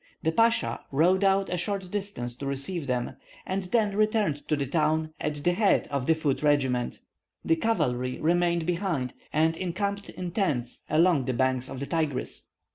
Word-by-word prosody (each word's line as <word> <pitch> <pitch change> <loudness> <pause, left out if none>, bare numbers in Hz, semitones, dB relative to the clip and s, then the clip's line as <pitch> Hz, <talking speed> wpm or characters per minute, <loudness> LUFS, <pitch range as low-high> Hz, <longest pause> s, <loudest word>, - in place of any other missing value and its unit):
The 160 - +2
Pasha 195 - +2
rode 175 +7 +3
out 195 -1 +3
a 180 - 0
short 190 0 -3
distance 195 -13 -4
to 140 - -5
receive 140 +3 -3
them, 125 0 -2 0.3
and 190 0 -2
then 210 +1 +1
returned 210 -8 +1
to 150 - +2
the 140 -1 -1
town 155 +2 0
at 150 -1 -3
the 175 - +4
head 205 +2 +3
of 140 -3 -1
the 160 - +5
foot 150 -4 0
regiments. 135 -5 +1 0.5
The 165 - +3
cavalry 125 - 0
remained 170 0 +2
behind, 170 -7 -1 0.2
and 160 +2 +2
encamped 200 +3 -3
in 180 -1 -5
tents 145 - -1
along 160 -4 +4
the 130 - -1
banks 130 +1 0
of 130 - -6
the 140 - -3
Tigris. 155 -5 -1
160 Hz, 175 wpm, -27 LUFS, 135-190 Hz, 0.5 s, the